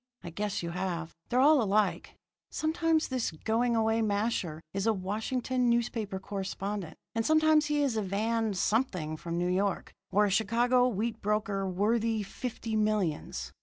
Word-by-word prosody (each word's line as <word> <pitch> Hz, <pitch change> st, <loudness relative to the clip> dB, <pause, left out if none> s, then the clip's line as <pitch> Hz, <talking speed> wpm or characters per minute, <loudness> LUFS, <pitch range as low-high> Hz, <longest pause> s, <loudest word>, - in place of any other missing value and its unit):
I 175 Hz, -, -7 dB
guess 200 Hz, +1 st, -3 dB
you 170 Hz, -, -3 dB
have. 170 Hz, -2 st, -3 dB, 0.2 s
They're 250 Hz, -, +2 dB
all 290 Hz, +1 st, +6 dB
alike. 210 Hz, -1 st, 0 dB, 0.3 s
Sometimes 320 Hz, 0 st, +1 dB
this 255 Hz, -3 st, -1 dB
going 225 Hz, +8 st, 0 dB
away 225 Hz, 0 st, +2 dB
masher 205 Hz, -6 st, -1 dB
is 195 Hz, +2 st, -1 dB
a 225 Hz, -, +4 dB
Washington 235 Hz, +6 st, -1 dB
newspaper 225 Hz, -4 st, 0 dB
correspondent, 195 Hz, -1 st, -4 dB, 0.2 s
and 225 Hz, -, 0 dB
sometimes 310 Hz, +2 st, +4 dB
he 295 Hz, -1 st, +1 dB
is 255 Hz, -6 st, 0 dB
a -, -, +1 dB
Van 215 Hz, +2 st, 0 dB
Something 185 Hz, -7 st, 0 dB
from 170 Hz, +2 st, -5 dB
New 175 Hz, +1 st, 0 dB
York, 190 Hz, +1 st, -1 dB, 0.2 s
or 205 Hz, +2 st, +3 dB
a 200 Hz, -, 0 dB
Chicago 240 Hz, +5 st, +3 dB
wheat 225 Hz, 0 st, -2 dB
broker 205 Hz, -2 st, 0 dB
worthy 220 Hz, +3 st, +1 dB
fifty 225 Hz, +1 st, -5 dB
millions. 210 Hz, -7 st, -1 dB
215 Hz, 155 wpm, -30 LUFS, 195-235 Hz, 0.3 s, all